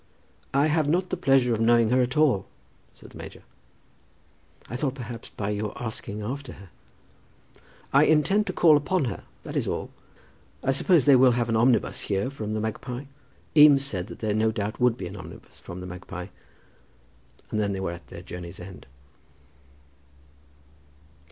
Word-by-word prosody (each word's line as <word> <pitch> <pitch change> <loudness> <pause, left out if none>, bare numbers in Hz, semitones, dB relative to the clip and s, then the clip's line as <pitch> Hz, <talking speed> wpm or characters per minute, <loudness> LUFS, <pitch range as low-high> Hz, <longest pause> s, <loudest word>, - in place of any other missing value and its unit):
"I 140 +2 +4
have 155 -1 +2
not 180 +3 +1
the - - +1
pleasure 135 -8 +3
of 110 - -1
knowing 115 0 +4
her 130 +1 +4
at 125 +3 -1
all," 130 -11 +3 0.4
said - - -15
the - - -12
major. - - -10 1.2
"I 120 - -6
thought, 135 0 -1
perhaps, 120 -3 -8
by 105 0 -4
your 105 0 -3
asking 110 -2 -5
after 135 +3 -5
her 95 -1 -14 0.7
" - - -28
"I 140 +2 +6
intend 190 +8 +3
to - - 0
call 160 -4 +6
upon 150 +2 0
her, 110 -7 -5 0.2
that - - -7
is - - 0
all. - - -3 0.7
I 135 - +2
suppose 150 +2 +3
they 140 -2 +7
will 130 -1 +6
have 120 0 0
an 115 - +1
omnibus 120 +2 +2
here 100 +6 -1
from 110 -5 -4
'The 110 - -1
Magpie?'" 120 +4 -4 0.5
Eames 145 -2 +7
said 95 -8 -3
that - - -9
there 110 -2 0
no 110 +1 +2
doubt 105 -1 -4
would 125 -2 +3
be 95 - -5
an 90 +3 -7
omnibus 85 -2 -10
from 90 +1 -8
"The - - -7
Magpie," 90 0 -8 1.2
and 110 - -1
then 100 -1 0
they 95 - -3
were 95 -2 -2
at 85 -3 -10
their - - -10
journey's 85 -1 -8
end. 95 +1 -11
120 Hz, 175 wpm, -26 LUFS, 100-140 Hz, 1.2 s, they